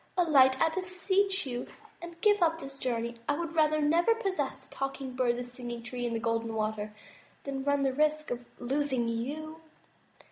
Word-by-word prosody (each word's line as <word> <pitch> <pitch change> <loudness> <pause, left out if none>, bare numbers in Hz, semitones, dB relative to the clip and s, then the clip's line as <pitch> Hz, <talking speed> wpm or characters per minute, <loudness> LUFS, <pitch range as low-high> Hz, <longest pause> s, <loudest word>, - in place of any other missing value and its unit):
Alight, 270 -7 +5
I 325 - +4
beseech 375 +2 +1
you, 245 -2 -4 0.3
and 340 0 -9
give 415 -2 +4
up 325 -1 +3
this 275 -2 -8
journey. 235 -1 -2
I 290 - +2
would 335 -1 -3
rather 310 -1 +3
never 340 +9 +4
possess 370 - -2
the 265 - -17
Talking 270 -1 -4
Bird, 245 -2 +2
the 245 - -3
Singing 245 -1 -7
Tree 245 +1 -3
and 230 - -2
the - - 0
Golden 230 0 -1
Water 215 -1 -2 0.5
than 270 -1 -3
run 285 0 +2
the 265 -1 +1
risk 305 +1 +1
of 245 0 -3 0.2
losing 265 -1 0
you." 300 +8 -4
275 Hz, 180 wpm, -30 LUFS, 245-320 Hz, 0.5 s, Alight